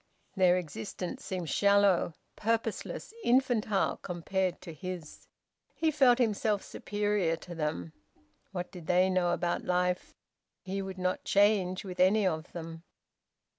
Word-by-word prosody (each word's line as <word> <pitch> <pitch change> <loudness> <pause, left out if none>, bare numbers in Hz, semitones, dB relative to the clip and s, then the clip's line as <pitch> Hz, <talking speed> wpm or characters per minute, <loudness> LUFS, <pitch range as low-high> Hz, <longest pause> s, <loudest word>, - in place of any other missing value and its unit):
Their 185 -2 +5
existence 165 - -5
seemed 180 -6 -4
shallow, 200 -4 +4 0.2
purposeless, 225 - -2
infantile, 240 - +2
compared 185 +1 -2
to 170 - -8
his. 175 0 -7 0.5
He 320 -1 +1
felt 265 -5 +5
himself 215 -3 +1
superior 205 -5 -1
to 175 +1 -10
them. 150 - -3 0.6
What 180 -2 -4
did 175 -3 -10
they 185 +1 +4
know 180 -1 +2
about 175 0 0
life? 180 0 0 0.5
He 195 +1 -3
would 190 -1 -6
not 185 0 -1
change 200 -2 +2
with 185 -1 -7
any 195 +3 +4
of 160 -3 -1
them. 165 -1 -7
185 Hz, 130 wpm, -30 LUFS, 175-205 Hz, 0.6 s, Their